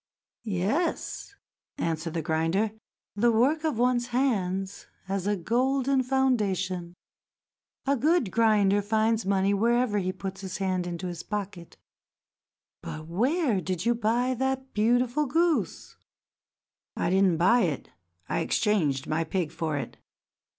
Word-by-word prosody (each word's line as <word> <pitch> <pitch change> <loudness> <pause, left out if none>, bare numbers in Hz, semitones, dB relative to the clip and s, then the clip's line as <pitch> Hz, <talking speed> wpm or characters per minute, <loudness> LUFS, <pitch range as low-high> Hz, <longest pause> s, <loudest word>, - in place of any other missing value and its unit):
"Yes," 220 - -2 0.4
answered 165 0 -2
the 165 - -1
grinder. 165 +7 0 0.4
"The 235 +3 +3
work 270 +8 +2
of 310 -7 0
one's 240 0 +2
hands 200 -7 -1 0.2
has 195 0 -2
a 205 - +2
golden 260 +7 +1
foundation. 195 -9 0 0.9
A 280 - +2
good 285 - +2
grinder 210 -3 +3
finds 220 +1 +1
money 195 0 +2
whenever 230 +1 +2
he 185 -1 -1
puts 190 +1 -7
his 190 -2 -5
hand 185 -2 -1
into 175 +1 -5
his 175 -2 -5
pocket. 195 -5 -6 1.0
But 155 0 -7
where 235 - +1
did 180 +2 -3
you 240 - +4
buy 235 +3 +1
that 265 0 -2
beautiful 245 +6 +2
goose?" 330 +3 0 1.0
"I 170 - 0
did 190 +1 +4
not 180 -4 +3
buy 190 +9 +4
it; 150 -6 -4 0.4
I 85 - -1
exchanged 155 -11 +1
my 155 +2 0
pig 165 -1 -2
for 160 -3 -2
it." 140 - -6
205 Hz, 130 wpm, -27 LUFS, 180-245 Hz, 1.0 s, you